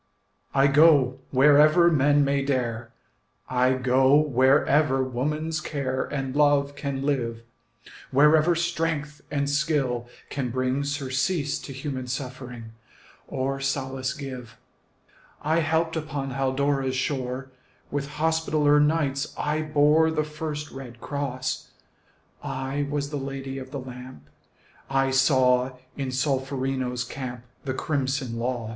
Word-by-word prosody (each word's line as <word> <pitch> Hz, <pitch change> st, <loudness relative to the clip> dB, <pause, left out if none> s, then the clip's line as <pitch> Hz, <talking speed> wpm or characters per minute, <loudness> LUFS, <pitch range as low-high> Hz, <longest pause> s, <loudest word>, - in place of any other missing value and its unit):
I 135 Hz, 0 st, +5 dB
go 140 Hz, -3 st, +5 dB
wherever 150 Hz, +5 st, +6 dB
men 145 Hz, -1 st, +4 dB
may 140 Hz, 0 st, +1 dB
dare, 120 Hz, -4 st, -2 dB, 0.6 s
I 125 Hz, 0 st, +2 dB
go 130 Hz, +1 st, +3 dB
wherever 140 Hz, 0 st, +3 dB
woman's 150 Hz, +5 st, -2 dB
care 130 Hz, -4 st, -2 dB
And 135 Hz, -2 st, -4 dB
love 145 Hz, -1 st, +3 dB
can 140 Hz, -1 st, -3 dB
live, 120 Hz, -5 st, -1 dB, 0.7 s
Wherever 155 Hz, +5 st, +5 dB
strength 165 Hz, -3 st, -2 dB
and 140 Hz, -1 st, -1 dB
skill 145 Hz, -5 st, 0 dB, 0.2 s
can 135 Hz, -3 st, -2 dB
bring 130 Hz, +3 st, -1 dB
Surcease 140 Hz, +2 st, -1 dB
to -, -, -9 dB
human 135 Hz, -1 st, -5 dB
suffering, 125 Hz, -3 st, -6 dB, 0.6 s
Or 135 Hz, +1 st, -2 dB
solace 135 Hz, 0 st, -2 dB
give. 130 Hz, -6 st, -8 dB, 0.9 s
I 160 Hz, +3 st, +2 dB
helped 160 Hz, +1 st, 0 dB
upon 145 Hz, -3 st, -3 dB
Haldora's 135 Hz, 0 st, 0 dB
shore; 130 Hz, 0 st, -3 dB, 0.4 s
With 140 Hz, -1 st, -2 dB
Hospitaller 155 Hz, -2 st, +2 dB
Knights 150 Hz, -2 st, +1 dB
I 150 Hz, +1 st, -1 dB
bore 155 Hz, +1 st, +4 dB
The 155 Hz, -1 st, 0 dB
first 150 Hz, -1 st, -5 dB
red 125 Hz, -3 st, -9 dB
cross; 130 Hz, -2 st, -3 dB, 0.7 s
I 135 Hz, +2 st, -3 dB
was 145 Hz, 0 st, -2 dB
the 145 Hz, -, -2 dB
Lady 135 Hz, 0 st, -5 dB
of 130 Hz, 0 st, -9 dB
the 140 Hz, -, -5 dB
Lamp; 125 Hz, 0 st, -10 dB, 0.6 s
I 135 Hz, 0 st, +2 dB
saw 130 Hz, -1 st, +3 dB, 0.2 s
in 135 Hz, -2 st, -3 dB
Solferino's 130 Hz, -2 st, -1 dB
camp 125 Hz, -2 st, -6 dB, 0.2 s
The 130 Hz, -1 st, -2 dB
crimson 135 Hz, -5 st, -2 dB
loss. 120 Hz, -2 st, -2 dB
135 Hz, 120 wpm, -25 LUFS, 130-150 Hz, 0.9 s, wherever